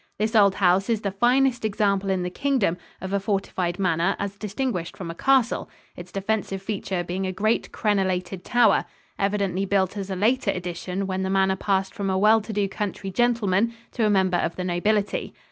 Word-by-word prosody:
This 215 +2 -1
old 200 -3 +5
house 190 +2 +3
is 225 -2 +1
the 200 - -2
finest 245 +4 +2
example 200 -2 +1
in 190 -2 0
the 180 - -3
Kingdom 255 -7 +1 0.3
of 190 +1 -5
a 200 - +2
fortified 190 -3 -2
manor 180 0 +1
as 200 0 -4
distinguished 205 -3 -3
from 170 -3 -5
a - - -7
castle, 260 +5 +2 0.3
its 175 0 -10
defensive 195 0 -2
feature 190 -2 -3
being 185 +2 -3
a - - -1
great 215 +4 0
crenolated 190 -3 -1
tower, 240 -3 +3 0.3
evidently 195 -2 0
built 190 -1 +1
as 195 -1 -4
a 190 - -2
later 230 +8 +1
addition 180 +2 -3
when 190 0 -2
the 190 - -1
manor 190 0 +2
passed 190 0 0
from 200 -3 -3
a 190 - +1
well 215 +3 +5
to 215 - -7
do 205 -1 0
country 195 -1 -4
gentleman 230 0 +1 0.2
to 235 - -1
a 215 - +3
member 190 -3 +3
of 170 - -1
the 185 - -4
nobility. 200 +4 0
195 Hz, 195 wpm, -24 LUFS, 185-215 Hz, 0.3 s, old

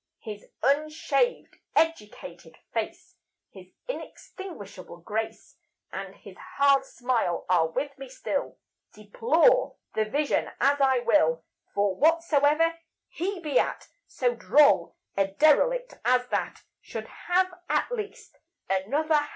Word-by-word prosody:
His 210 -2 -8 0.2
unshaved, 305 - 0 0.2
educated 195 - -2 0.2
face, 360 +11 -4 0.3
His - - -13 0.2
inextinguishable 330 - -8
grace, 215 +6 -5 0.3
And - - -6
his - - -13 0.2
hard 275 -1 +4
smile, 245 -10 -1
are 175 -3 +3
with 280 - -3
me 270 -1 -8
still, 275 +2 -3 0.4
Deplore 270 - +2 0.2
the 220 - +1
vision 285 +7 0
as 280 +1 +3
I 265 -2 +4
will; 165 -9 +2 0.3
For 200 -1 +1
whatsoever 325 - +3 0.3
he 370 +2 -3
be 300 -3 +2
at, - - -2 0.2
So 245 -2 0
droll 285 +4 +4 0.2
a 195 0 +2
derelict 400 - +3
as 250 0 +3
that - - -2 0.2
Should - - -7
have 370 +1 0 0.2
at - - +1
least 430 -4 -6 0.3
another 280 +12 0
hat. 295 0 -1
280 Hz, 120 wpm, -27 LUFS, 215-330 Hz, 0.4 s, hard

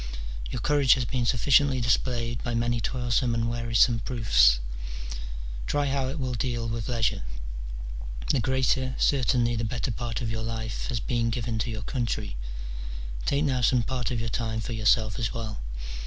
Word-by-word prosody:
Your - - -3
courage 145 -3 +5
has 125 -2 -1
been 120 -1 -1
sufficiently 135 +2 +4
displayed 120 -1 0
by 120 -1 -2
many 120 0 +1
toilsome 120 0 +1
and 115 0 +1
wearisome 115 0 +3
proofs; - - +4 1.1
try 145 0 +1
how 135 -1 0
it 135 +4 -3
will 130 -3 -2
deal 120 -1 -1
with 115 0 -3
leisure: 115 -3 +1 1.1
the - - +2
greater, 130 +1 +1
certainly 125 -3 +3
the 115 - -1
better 120 +3 -1
part 115 +1 -3
of 115 -3 -2
your 110 0 -2
life, 110 -1 -3
has 120 -4 -1
been 115 +1 0
given 115 -1 -2
to 120 - -1
your 110 -2 -4
country; 110 - -2 0.9
take 140 +1 +2
now^ 130 -3 +1
some 120 0 +4
part 125 0 -2
of 125 -3 -1
your 115 +1 -2
time 110 -2 -1
for 115 +2 -4
yourself 110 +1 +2
as 115 -1 -1
well. 110 -2 -4
120 Hz, 170 wpm, -27 LUFS, 115-130 Hz, 1.1 s, courage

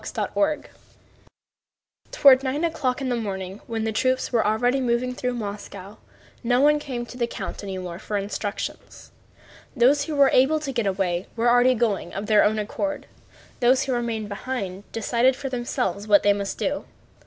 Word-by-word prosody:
CHAPTER - - -4
XXV 300 0 +1 1.5
Toward 270 -2 +6
nine 275 +4 -2
o'clock 275 -6 -1
in 265 - -2
the 245 - +1
morning, 195 -3 -5
when 225 -1 -3
the 220 - -1
troops 255 +4 0
were 235 -3 +2
already 245 +5 +1
moving 250 0 0
through 250 0 -3
Moscow, 205 -2 -7 0.5
nobody 275 +5 +4
came 250 -5 -5
to 245 - -11
the 235 - +1
count - - -6
any 195 -1 -5
more 180 -1 -6
for 210 0 -3
instructions. 200 +1 -5 0.6
Those 275 +4 +4
who 315 - -4
were 280 -1 +5
able 280 +5 +4
to 290 -3 -4
get 235 -5 -1
away 185 -2 -1
were 245 +2 +4
going 220 -4 -1
of 195 +2 -3
their 210 -1 +5
own 215 +1 +2
accord, 290 +8 -3 0.5
those 255 +1 +4
who 265 - -2
remained 230 -3 -2
behind 200 -2 -5
decided 235 +3 +2
for 275 0 -5
themselves 240 -5 -2
what 205 -1 +5
they 205 - +5
must 200 -1 -4
do. 290 +1 -2
240 Hz, 170 wpm, -24 LUFS, 205-260 Hz, 1.5 s, Toward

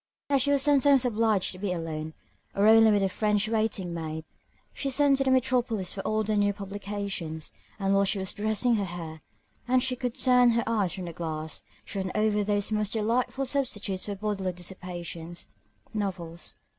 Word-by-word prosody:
As 275 -2 +4
she 285 - +2
was 280 -1 +3
sometimes 280 -2 +4
obliged 220 -4 +2
to 185 - -9
be 200 -1 -2
alone, 160 -2 -4 0.4
or 200 - +3
only 225 0 +7
with 205 -2 +3
her - - +3
French 210 +1 +1
waiting 215 -5 -1
maid, 160 -1 -5 0.5
she 275 - -3
sent 280 0 +4
to 270 - +2
the 265 - +1
metropolis 245 -7 +1
for 195 - -4
all 215 +2 0
the 215 0 0
new 205 0 +2
publications, 200 -5 -5 0.2
and 195 -1 +1
while 195 0 +4
she 200 +1 +1
was 190 0 -3
dressing 220 +3 +1
her 200 - -1
hair, 165 -3 -7 0.5
and 255 0 +3
she 260 -1 +1
could 245 -2 -3
turn 250 -1 +5
her 235 - +2
eyes 210 -6 0
from 185 -2 -5
the 170 - -6
glass, 160 -2 -5 0.2
she 200 - -5
ran 190 -1 -2
over 215 -1 +2
those 205 0 0
most 210 -1 0
delightful 235 +5 0
substitutes 230 -8 -1
for 205 - -4
bodily 195 -2 -2
dissipation, 175 -2 -7 0.6
novels. 180 -5 -4
205 Hz, 185 wpm, -28 LUFS, 185-230 Hz, 0.6 s, only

